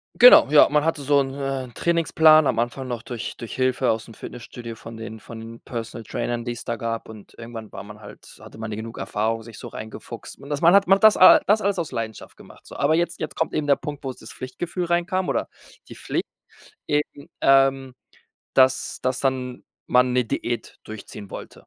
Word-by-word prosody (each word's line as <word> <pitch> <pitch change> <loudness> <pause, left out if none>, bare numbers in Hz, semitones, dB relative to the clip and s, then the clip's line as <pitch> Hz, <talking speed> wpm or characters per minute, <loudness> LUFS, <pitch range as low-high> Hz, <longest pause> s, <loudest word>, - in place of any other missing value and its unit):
Genau, 245 - +9
ja, 150 -1 +7
man 150 0 +2
hatte 160 -2 -1
so 140 +1 +3
'n, 135 -1 -3
äh 135 -1 -3
'n 120 - -13
Trainingsplan, 160 -2 +4
am - - +1
Anfang 120 +3 -2
noch 120 -2 -4
durch 120 -1 -6
durch 120 - -8
Hilfe 130 0 +1
aus'm 110 0 -3
Fitnessstudio 115 -1 -9
von 115 +1 -11
den 110 0 -8
von 115 +2 -10
den 115 +1 -10
Personal 115 -1 -6
Trainern, 120 +2 -3
die 120 - -3
es 120 - -9
da 115 - -3
gab. 115 0 -4
Und 110 -2 -13
irgendwann 115 -2 -9
war - - -7
man 105 +1 -12
halt 105 - -13
hatte - - -13
man 110 -1 -5
die 105 - -4
genug 115 +1 -7
Erfahrung, 115 +2 -2
sich 110 -1 -12
so - - -8
reingefuchst. 110 +1 -9
Und 140 - -12
das 145 -1 -2
man 170 +2 +6
hat 200 0 +5
macht 195 +3 +4
das 215 - +8 0.3
das 210 +2 +4
alles 200 -2 0
aus 165 -5 -3
Leidenschaft 115 -3 -6
gemacht, - - -17
so. - - -11
Aber 145 +3 +2
jetzt 170 +1 -1
jetzt - - -5
kommt 160 - -1
eben 150 - -1
der 140 -1 +4
Punkt, 145 -1 -7
wo 135 - -3
es 130 - -9
das 110 - -12
Pflichtgefühl 170 +7 -5
reinkam 175 +2 0
oder - - -1 0.4
die - - -10
Pflicht - - -3 0.6
eben, 145 -1 -2
ähm, 135 -1 +3 0.6
dass 130 0 +3
dass 130 0 -1
dann 130 -2 -2 0.2
man 125 0 +3
'ne 125 0 +2
Diät 115 +1 -4
durchziehen 105 -2 -10
wollte. - - -10
130 Hz, 215 wpm, -23 LUFS, 115-150 Hz, 0.6 s, Genau